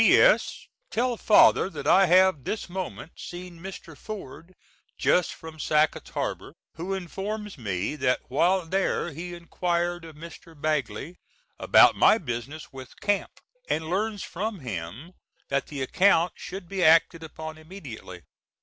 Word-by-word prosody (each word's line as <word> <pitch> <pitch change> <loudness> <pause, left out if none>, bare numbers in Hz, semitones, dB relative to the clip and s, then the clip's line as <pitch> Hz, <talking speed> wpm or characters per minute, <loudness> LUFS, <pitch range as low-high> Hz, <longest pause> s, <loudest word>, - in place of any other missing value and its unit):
P.S. - - +4 0.2
Tell 245 +2 0
father 210 -3 +5
that 145 -6 -7
I 195 0 +6
have 185 -4 +4
this 215 - -3
moment 175 - -6
seen 175 -1 -9
Mr. 175 -3 -9
Ford, 185 -1 -9 0.4
just 180 -2 +2
from 160 -1 -11
Sacketts 155 0 +1
Harbor, - - -4 0.2
who 180 +4 -4
informs 200 +3 -5
me 105 - -3
that 130 -3 +1
while 175 +6 +2
there 185 0 0
he 175 +4 -7
enquired 175 0 -2
of 160 -2 -11
Mr. 165 0 -12
Bagley 155 +3 -2 0.4
about - - +6
my - - +6
business 140 - -6
with 130 -2 -11
Camp, 205 -1 0 0.4
and 160 +1 -1
learns 205 +1 -1
from 205 0 -4
him 115 - -6 0.4
that 140 0 0
the 140 -3 -4
account 180 +4 +3
should 185 -1 -8
be 190 0 -2
acted 165 +1 +5
upon 160 0 -8
immediately. 140 - -10
170 Hz, 140 wpm, -26 LUFS, 150-190 Hz, 0.4 s, I